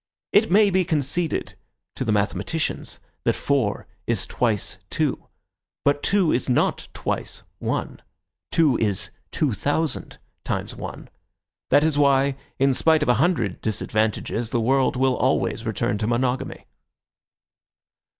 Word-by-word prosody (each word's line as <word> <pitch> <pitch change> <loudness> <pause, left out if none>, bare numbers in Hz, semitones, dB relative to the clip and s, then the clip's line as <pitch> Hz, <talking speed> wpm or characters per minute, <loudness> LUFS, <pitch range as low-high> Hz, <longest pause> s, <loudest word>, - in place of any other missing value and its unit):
It 215 +2 +5
may 205 +2 +5
be 185 0 +3
conceded 160 +1 -1 0.4
to - - -3
the 115 - 0
mathematicians 105 - -1 0.2
that - - +2
four - - 0 0.2
is - - +1
twice 110 -5 -1
two. - - -1 0.6
But 145 0 +3
two 195 -4 +2
is 125 - 0
not 125 - +1
twice - - -3 0.2
one; - - -3 0.5
two 150 -7 +4
is 100 -4 0 0.2
two 145 -6 0
thousand 145 +8 -1 0.3
times - - -3
one. - - -7 0.6
That 145 - +5
is 155 -2 +2
why, 140 -1 +4 0.2
in 135 0 +3
spite 160 +3 +3
of 150 - -1
a - - +6
hundred 130 - +1
disadvantages, 110 +1 -1
the 120 - 0
world 130 +4 +2
will 130 0 +2
always 125 -3 0
return 105 -1 -1
to 105 - -1
monogamy. 125 +2 -1
135 Hz, 130 wpm, -24 LUFS, 115-155 Hz, 0.6 s, a